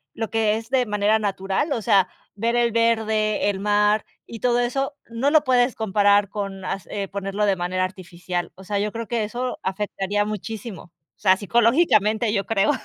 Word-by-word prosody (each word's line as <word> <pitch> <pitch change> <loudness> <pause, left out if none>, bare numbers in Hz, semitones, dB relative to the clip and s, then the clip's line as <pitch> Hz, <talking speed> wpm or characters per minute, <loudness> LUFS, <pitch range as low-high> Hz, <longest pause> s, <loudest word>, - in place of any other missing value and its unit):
lo 225 -2 -4
que 220 -1 +2
es 225 +2 -9
de 255 -3 +2
manera 210 +1 +2
natural, 195 - -1
o 235 -5 -1
sea, 195 -4 +3 0.2
ver 230 +4 -1
el 235 -1 +2
verde, 220 -2 +1
el 190 - -6
mar 210 +1 +2 0.2
y 230 - -9
todo 245 0 +2
eso, 270 +4 -1
no 235 +5 0
lo 310 0 +4
puedes 250 -1 +2
comparar 205 -1 +3
con 195 -2 -5
hace 195 +1 -4
ponerlo 200 +1 -2
de 195 -2 +2
manera 185 +1 -1
artificial. 180 -1 -5
O 190 - -13
sea, 200 +1 -2
yo 210 +1 -1
creo 230 0 -5
que 230 -1 -1
eso 245 +4 -4
afectaría 205 +1 -2
muchísimo, 215 -1 -6
o - - -24 0.3
sea, 185 0 +4
psicológicamente, 220 - +2
yo 200 -2 0
creo, 215 +2 +2
210 Hz, 180 wpm, -23 LUFS, 195-230 Hz, 0.3 s, lo